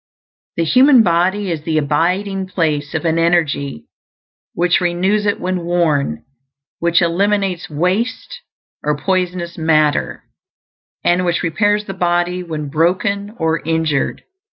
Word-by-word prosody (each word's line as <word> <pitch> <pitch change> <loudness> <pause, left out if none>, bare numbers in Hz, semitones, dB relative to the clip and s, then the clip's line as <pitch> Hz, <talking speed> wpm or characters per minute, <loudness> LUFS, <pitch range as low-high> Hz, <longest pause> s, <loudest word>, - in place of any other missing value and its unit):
The 170 - +2
human 255 - +5
body 185 +2 +1
is 160 -3 -3
the 155 0 -1
abiding 180 +6 0
place 155 -6 -1
of - - -2
an 165 0 +1
energy 155 - 0 0.7
which 175 +1 +2
renews 190 +4 +1
it 205 - 0
when 180 -1 -2
worn; 160 - 0 0.5
which 170 +1 +2
eliminates 195 +1 0
waste 200 - -2 0.4
or 150 0 0
poisonous 180 0 -2
matter, 155 -2 +1 0.8
and 175 +1 +2
which 175 0 0
repairs 205 +5 +1
the 195 - -5
body 175 0 0
when 155 -4 -5
broken 190 +7 0
or 160 0 0
injured. 160 -3 -1
175 Hz, 125 wpm, -17 LUFS, 160-190 Hz, 0.8 s, human